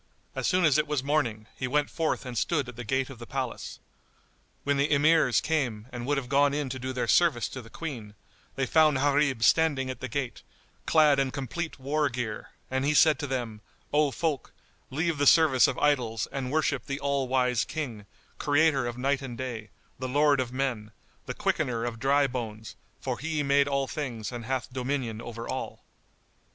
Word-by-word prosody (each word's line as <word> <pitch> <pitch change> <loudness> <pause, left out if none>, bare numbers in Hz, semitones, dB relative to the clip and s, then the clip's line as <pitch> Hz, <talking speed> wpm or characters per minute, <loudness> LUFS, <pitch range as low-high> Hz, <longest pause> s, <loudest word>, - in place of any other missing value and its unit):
As - - -1
soon 180 -1 +3
as 150 -1 +4
it 150 - 0
was 145 -3 -1
morning, 125 -7 0
he 125 - -3
went 145 +2 +1
forth 160 -4 -2
and 125 -1 -6
stood 145 +2 0
at 125 - -9
the 120 - -6
gate 130 +3 -1
of 125 - -11
the 120 - -9
palace. 130 -3 -4 0.9
When 140 0 +1
the 140 +2 +1
Emirs 150 -3 +4
came 125 -10 -1
and 120 0 -6
would 145 0 +1
have 135 -3 -3
gone 140 +1 +3
in 145 -2 -2
to 130 +1 -5
do 130 +1 -4
their 125 -1 -2
service 155 -11 +3
to 130 - -7
the 115 - -14
Queen, 115 -9 -7 0.4
they 135 - 0
found 155 -1 +4
Gharib 140 -3 +2
standing 140 -2 +3
at 130 - -8
the 130 - -4
gate, 125 -2 -4 0.5
clad 150 -3 +5
in 135 -1 +1
complete 145 +5 -4
war 145 +2 0
gear; 115 -3 -4 0.2
and 130 0 0
he 150 +2 +1
said 155 0 +5
to 145 - -3
them, 120 -5 -4 0.3
"O 150 0 +4
folk, 150 -1 -2 0.4
leave 160 +2 -1
the 145 - +3
service 155 -6 +6
of - - -2
idols 125 -7 +1
and 130 -2 -3
worship 150 -4 0
the 140 0 -3
All 140 -2 0
wise 125 -2 +2
King, 120 -10 -5 0.3
Creator 145 -3 +3
of 120 0 -5
Night 140 +2 0
and 125 -3 -7
Day, 115 -4 -5 0.3
the 130 0 -3
Lord 145 +1 +3
of 125 -2 -1
men, 125 -5 -2 0.4
the - - -4
Quickener 120 -1 -1
of 115 -2 -4
dry 140 +3 +3
bones, 110 -4 -5 0.2
for - - -3
He 155 0 -1
made 140 0 +3
all 140 -1 0
things 130 -8 -4
and 120 -2 -6
hath 130 0 -3
dominion 125 -4 -2
over 115 0 -7
all." 130 - -5
135 Hz, 195 wpm, -28 LUFS, 125-145 Hz, 0.9 s, service